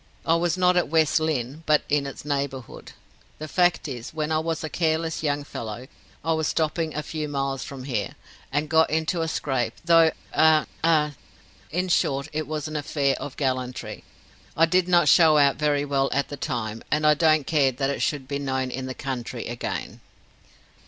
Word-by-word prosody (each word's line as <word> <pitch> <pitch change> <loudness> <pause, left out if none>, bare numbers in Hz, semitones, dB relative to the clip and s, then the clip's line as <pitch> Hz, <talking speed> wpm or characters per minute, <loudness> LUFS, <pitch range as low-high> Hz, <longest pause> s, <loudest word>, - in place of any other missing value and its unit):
I 165 - +3
was 170 +1 +1
not 180 0 +3
at 175 - +2
West 155 0 +3
Lynne, 150 -2 -2
but 150 -1 +4
in 145 -1 +1
its 135 - -9
neighborhood. 140 -3 -4 0.4
The 155 - -6
fact 175 0 +2
is, 125 +1 -7
when 155 0 -2
I 155 - +2
was 165 0 -2
a - - -2
careless 160 0 -1
young 145 -2 -1
fellow, 115 -3 -7 0.4
I 165 - +2
was 160 -1 0
stopping 155 0 -1
a 150 - -2
few 155 0 -4
miles 135 -1 -2
from 135 -2 -8
here, 115 -7 -3 0.4
and 145 +2 0
got 160 +1 +4
into 160 +2 0
a 165 - -1
scrape, 130 -7 -1
through 165 -1 +6 0.2
a 155 -1 +5 0.2
a 155 -2 +3 0.6
in 180 +3 -1
short 140 -3 +1
it 155 -1 -2
was 155 0 -3
an 155 - -7
affair 145 -2 0
of 145 - -7
gallantry. 130 -2 -3 0.5
I 165 - +6
did 180 +2 +2
not 175 -3 +4
show 155 0 +6
out 140 -1 +4
very 145 -1 +1
well 135 -1 +1
at 140 +1 0
the 145 - -5
time, 120 -6 -4
and 150 0 +1
I 150 - +7
don't 155 -1 +3
care 140 -4 +3
that 135 +2 -1
it - - -4
should 140 -3 -1
be 140 0 -3
known 130 -2 -2
in 130 0 -4
the 130 - -5
country 125 -2 -5
again." 120 0 -5
150 Hz, 195 wpm, -25 LUFS, 135-160 Hz, 0.6 s, I